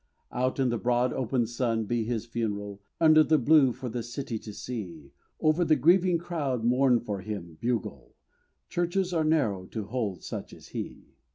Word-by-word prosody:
Out 130 +2 -1
in 130 -2 +3
the 120 -1 -1
broad 125 +1 +1
open 125 -1 0
sun 115 -1 -1
be 120 +2 0
his 115 -1 -2
funeral, 105 -4 -4 0.2
Under 155 -1 +7
the 155 0 +3
blue 140 0 +5
for 125 - -6
the 120 +1 -3
city 120 -1 -5
to 105 - -9
see. 90 - -7 0.3
Over 155 +3 +3
the 160 -2 +4
grieving 175 +5 +4
crowd 150 -8 -2
mourn 125 +1 +4
for 105 -4 -4
him, 90 -6 -7
bugle! 120 -3 -3 0.5
Churches 175 +1 -1
are 165 -2 +2
narrow 115 -13 +1
to 110 - -5
hold 105 -4 -3
such - - -6
as - - -15
he. - - -7
120 Hz, 175 wpm, -28 LUFS, 110-150 Hz, 0.5 s, Under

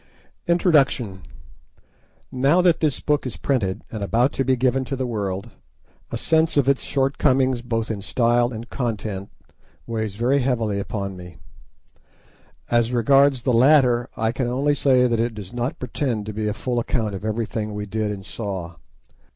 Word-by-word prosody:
INTRODUCTION 140 - +2 1.1
Now 135 +7 +3
that 175 -2 +4
this 150 -4 0
book 150 -3 0
is 125 - -6
printed, 105 -9 -1
and 110 - -5
about 115 +8 +2
to 135 - -1
be 130 0 +2
given 130 +1 +1
to 135 - -3
the 130 0 -2
world, 100 -5 -3 0.6
a - - -3
sense 160 -1 +1
of 140 -2 +3
its 140 -1 +3
shortcomings 135 -2 +1
both 115 -2 -2
in 105 -2 -4
style 120 +3 +2
and 115 0 -7
contents, 110 -7 -4 0.6
weighs 110 -3 -3
very 125 +6 +2
heavily 115 -6 0
upon 100 -1 -4
me. 90 -1 -11 1.3
As 120 0 +2
regards 135 +2 +4
the 125 - +1
latter, 125 -1 +4
I 110 0 +1
can 125 0 -2
only 135 +4 +1
say 130 -3 +3
that 120 -2 +1
it 115 0 -1
does 105 0 -9
not 120 +2 -2
pretend 125 -3 -2
to 105 - -5
be 105 0 -2
a 105 - 0
full 120 +1 -2
account 115 -3 -1
of 95 - -6
everything 110 -1 -3
we 105 0 -4
did 105 +1 -2
and 95 -2 -7
saw. 95 -7 -5
120 Hz, 165 wpm, -22 LUFS, 105-130 Hz, 1.3 s, that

